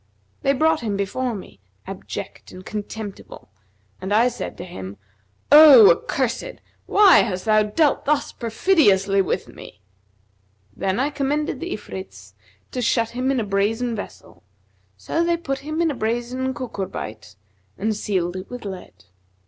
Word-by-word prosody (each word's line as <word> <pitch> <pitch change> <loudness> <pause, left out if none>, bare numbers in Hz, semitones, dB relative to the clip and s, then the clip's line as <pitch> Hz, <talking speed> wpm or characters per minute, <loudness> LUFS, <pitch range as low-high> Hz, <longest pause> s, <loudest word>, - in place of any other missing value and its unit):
They 275 - +2
brought 315 +3 +2
him 210 -4 -2
before 235 +5 -2
me, 185 - -11 0.3
abject - - -8
and 185 +1 -12
contemptible, 210 - -8 0.5
and 190 - -5
I 230 +4 +4
said 245 - -7
to - - -7
him, 100 - -9 0.5
'O 290 -8 +10
accursed, 260 - -2 0.3
why 400 -3 +6
hast 185 -3 -1
thou 215 -1 +4
dealt 275 +8 +1
thus 290 0 0
perfidiously 210 - +2
with 190 - -2
me?' - - -13 1.0
Then 190 +3 -1
I 280 +3 0
com 275 -1 -2
mended 300 +2 -1
the 345 +1 -5
Ifrits 95 - -8 0.4
to 250 - -3
shut 230 -1 +1
him 255 +2 -2
in 270 -2 +1
a - - -1
brazen 215 +4 -1
vessel[FN#245] 205 - -10 0.6
so 330 - -1
they 340 0 +1
put 275 -5 -4
him 310 +4 -2
in 325 - +1
a - - -5
brazen 240 +3 -2
cucurbite 115 - -6 0.4
and 215 +2 -1
sealed 185 -4 -2
it 185 0 -7
with 245 -3 -8
lead. 190 - -9
230 Hz, 150 wpm, -22 LUFS, 195-275 Hz, 1.0 s, O